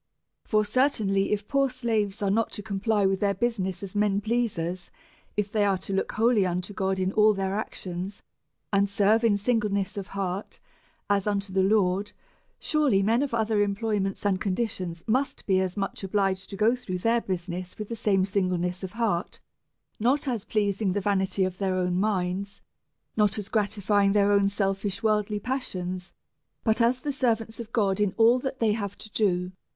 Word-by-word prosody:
Por 215 -1 +3
certainly, 205 -5 +1
if 210 0 -1
poor 275 -1 +2
slaves 220 -5 -1
are 195 - +2
not 225 +2 +1
to 205 - -4
comply 205 +1 0
with 190 0 +1
their 200 -1 +1
business 195 -4 -1
as 195 - -6
men 205 -1 +2
pleasers, 200 -6 -2 0.5
if 205 -1 -1
they 215 -2 +2
are 200 -2 +2
to 190 +1 -6
look 195 - -1
wholly 225 -2 +3
unto 180 +2 -2
God 190 0 -1
in 185 0 0
ail 215 0 +4
their 195 0 -1
actions, 190 -2 -5 0.5
and 200 0 +3
serve 205 +3 +3
in 215 -3 +4
singleness 205 -2 0
of 200 -1 -4
heart 195 0 -4 0.5
as 200 0 +1
unto 200 -2 -1
the 190 - +3
Lord, 195 0 +2 0.5
surely 285 -11 +2
men 225 +5 +3
of 285 - -1
other 220 -2 +1
employments 205 -1 -1
and 190 -3 +1
conditions 185 -5 -2
must 260 +5 0
be 190 -2 +3
as 185 +1 -2
much 195 0 -3
obliged 195 -1 0
to 195 - -6
go 220 +4 +3
through 205 -8 -4
their 230 +5 +2
business 180 -1 -4
with 215 - -5
the 230 - -4
same 195 -4 +2
singleness 185 -2 -1
of 190 - -5
heart, 215 -7 -1 0.6
not 265 +6 +2
as 235 -6 -2
pleasing 205 -2 0
the 205 - 0
vanity 190 -1 +1
of 185 -1 -2
their 190 -2 0
own 180 -1 0
minds, 195 -1 -1 0.6
not 210 -1 +2
as 210 -1 -5
gra 210 -3 +2
tifying 205 -1 +2
their 205 -1 +4
own 200 -1 +4
selfish 195 +1 -2
worldly 210 -1 +1
passions, 185 -7 -4 0.5
but 220 +1 +2
as 245 +2 +2
the 290 +1 -2
servants 230 -4 0
of 230 -1 -7
God 200 -4 +1
in 205 -2 +1
all 230 +3 +5
that 265 0 -4
they 225 -2 +3
have 200 -2 -3
to 215 - -10
do. 180 -4 +1
200 Hz, 185 wpm, -27 LUFS, 190-220 Hz, 0.6 s, all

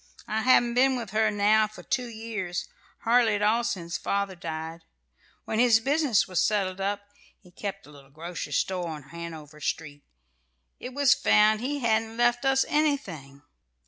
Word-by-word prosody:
"I 220 +1 -1
haven't 240 -1 +4
been 260 +2 +3
with 235 -5 -5
her 215 0 +2
now 210 +1 +3
for 215 - -13
two 250 -1 -1
years, 220 -6 -5 0.3
hardly 230 -2 +3
at 205 - -1
all 225 +3 +3
since 170 -6 -3
father 200 -1 -1
died. 165 -1 -6 0.6
When 220 - -2
his 235 -2 +5
business 275 -2 +2
was 185 -3 0
settled 195 -3 0
up 200 +1 -1 0.4
he 180 - -20
kept 195 +1 -6
a 150 - -15
little 140 -2 -16
grocery 165 +4 -6
store 180 -2 -1
on 155 -3 -6
Hanover 160 -2 -9
Street 145 -1 -4 0.8
it 250 +1 -8
was 280 -1 +5
found 215 -2 +3
he 285 +3 -2
hadn't 225 -1 0
left 240 +1 +2
us 270 0 +3
anything. 180 - -1
210 Hz, 165 wpm, -27 LUFS, 170-240 Hz, 0.8 s, his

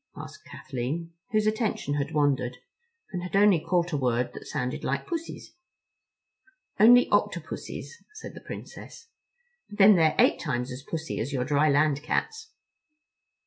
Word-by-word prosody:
asked - - -10
Kathleen, 150 +7 -5 0.2
whose 215 -2 +1
attention 215 - -1
had 145 0 -1
wandered, 135 -5 0 0.5
and 180 -3 -4
had 180 +2 -5
only 200 -3 +5
caught 175 +2 0
a 150 - 0
word 125 -2 0
that - - -10
sounded 125 0 -3
like 140 +1 -2
Pussies. 335 -1 -6 1.3
"Only 245 +4 +7
Octopussies," 470 - -3
said 430 - -9
the - - -11
Princess, 460 -1 -10 0.6
"but 205 - -10
then 205 -1 +7
they're 160 -2 +3
eight - - +4
times 125 +1 -3
as 125 +2 -7
pussy 160 +3 -5
as 120 +6 -3
your 130 -2 -1
dry 150 +2 +2
land 145 0 +2
cats." 445 - -2
155 Hz, 145 wpm, -27 LUFS, 135-205 Hz, 1.3 s, Only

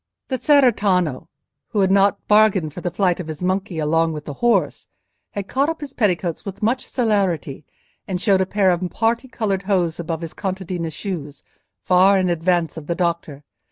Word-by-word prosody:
The 260 -2 -2
cerretano, 200 - +2 0.4
who 210 - 0
had 190 0 +3
not 200 +1 +2
bargained 210 -7 +3
for 180 - -7
the 175 - -1
flight 180 -1 0
of 175 - -5
his 155 +2 -6
monkey 185 -1 -1
along 165 +1 +1
with 150 -1 -7
the 145 - -5
horse, 240 -1 +1 0.5
had 200 -1 -4
caught 275 +7 +1
up 325 - -4
his 290 -3 -8
petticoats 180 -6 0
with 195 +1 -7
much 250 +4 0
celerity, 190 - -1 0.4
and 185 -3 -2
showed 195 -1 +3
a 190 - 0
pair 195 -2 +2
of 175 0 -1
parti 230 +5 0
coloured 210 -6 -2
hose 175 -5 +1
above 165 -1 -4
his 165 -1 -6
contadina's 185 -4 -4
shoes, 150 -5 -6 0.4
far 190 +2 +5
in 185 -2 +1
advance 170 -1 0
of 150 -2 -8
the 170 - -1
doctor. 170 -5 -2
185 Hz, 185 wpm, -21 LUFS, 165-205 Hz, 0.5 s, far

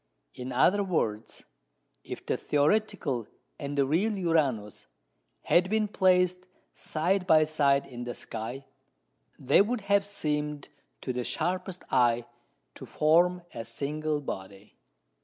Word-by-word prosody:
In 125 +1 -7
other 185 +11 +3
words, 115 - -2 0.6
if - - -8
the - - 0
theoretical 150 - 0 0.3
and 145 0 -5
the 140 - +4
real 195 +10 +1
Uranus 140 - 0 0.6
had 180 +2 +3
been 215 0 +1
placed 180 -2 +2 0.3
side 180 +4 -1
by 155 -3 +6
side 140 -3 +2
in 120 -1 -8
the 120 - -5
sky, 120 +5 -6 0.7
they - - +4
would 225 +3 0
have 200 0 +2
seemed, 150 -7 -3 0.3
to 130 - -3
the 125 0 -2
sharpest 180 +6 -3
eye, 120 -2 +3 0.5
to - - -11
form 175 +3 +3
a 115 - -5
single 145 +6 -3
body. 100 -5 -8
155 Hz, 125 wpm, -28 LUFS, 125-185 Hz, 0.7 s, by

